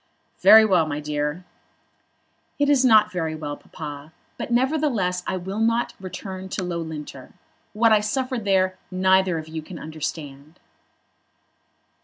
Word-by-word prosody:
"Very 220 +3 +8
well, 180 -6 +3
my 145 -1 -3
dear." 150 +3 -3 1.1
"It 285 0 +2
is 270 -2 +4
not 215 -4 +5
very 165 -4 -2
well, 145 -2 -5
Papa; 145 0 -9 0.2
but, - - -6
nevertheless, 240 -8 +1
I 185 - -1
will 190 +4 -5
not 230 +1 +1
return 190 0 -7
to 190 - -3
Loughlinter. 160 -6 -6 0.4
What 225 +1 +3
I 215 - +6
suffered 255 +2 -2
there 185 -2 +1
neither 185 -1 +2
of 160 -1 -6
you 160 0 -6
can 170 +3 -10
understand." 155 -1 -7
185 Hz, 135 wpm, -23 LUFS, 155-215 Hz, 1.1 s, Very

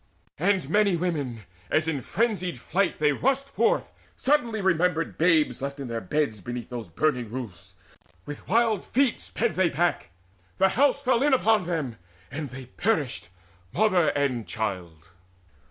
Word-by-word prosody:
And 185 -3 +1
many 200 +1 +3
women, 145 -10 -2 0.3
as 155 +1 +2
in 150 -4 -1
frenzied 195 - -1
flight 195 +2 0
They 150 -1 +3
rushed 270 - 0
forth, 445 - +1 0.2
suddenly 245 -6 +1
remembered 180 -3 +1
babes 160 -4 +2
Left 140 +1 -4
in 135 -3 -5
their 115 -1 -3
beds 110 -1 -1
beneath 120 +3 -6
those 120 -4 -5
burning 125 - 0
roofs: 95 -7 -8 0.5
With 145 0 -8
wild 225 -1 +2
feet 265 -1 +1
sped 235 0 -1
they 185 -2 +2
back 170 - 0 0.5
the 190 0 +4
house 280 +3 +2
fell 255 -2 +2
in 285 -1 +4
Upon 220 -6 +3
them, 155 -10 -3 0.3
and 145 +1 -4
they 130 +1 -9
perished, 145 - -1 0.4
mother 185 -4 +3
and 130 -6 0
child. 90 -7 -4
160 Hz, 150 wpm, -26 LUFS, 125-210 Hz, 0.5 s, the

